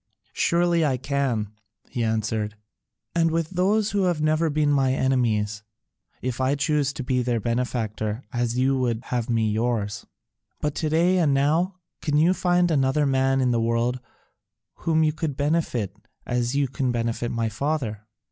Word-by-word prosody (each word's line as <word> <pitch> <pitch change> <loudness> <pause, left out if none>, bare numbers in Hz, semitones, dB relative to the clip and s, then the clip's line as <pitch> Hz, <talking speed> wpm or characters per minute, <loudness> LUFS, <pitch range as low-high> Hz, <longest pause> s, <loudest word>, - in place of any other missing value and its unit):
"Surely 170 -1 +2
I 135 -4 +1
can," 130 -6 -1 0.4
he 120 - -3
answered, 110 -1 -1 0.6
"and 165 -1 +3
with 165 0 -1
those 200 +4 +1
who 200 -2 +1
have 175 -3 +1
never 155 +1 +2
been 150 0 +1
my 135 -2 +3
enemies, 110 -6 +1 0.6
if 130 0 -2
I 130 +2 +2
choose 145 -1 +1
to 135 - -5
be 125 0 0
their 120 -1 0
benefactor 115 -1 -2
as 120 0 -1
you 135 +1 +2
would 120 -2 -1
have 125 -1 -2
me 110 -2 +1
yours." 110 -2 -1 0.5
"But 150 -1 -1
to 155 - -2
day, 175 +4 +3
and 150 -5 +3
now, 160 +7 +2 0.3
can 150 -1 +1
you 165 +4 +4
find 175 -1 +2
another 140 0 +2
man 135 0 +2
in 125 -1 +2
the 115 -1 +1
world 115 +2 0 0.8
whom 160 -1 +1
you 155 -1 +2
could 155 -3 -3
benefit 145 - 0 0.3
as 120 +1 -1
you 140 -1 +2
can 130 0 -1
benefit 120 0 -1
my 115 -1 -1
father? 115 -2 -2
130 Hz, 165 wpm, -24 LUFS, 115-155 Hz, 0.8 s, you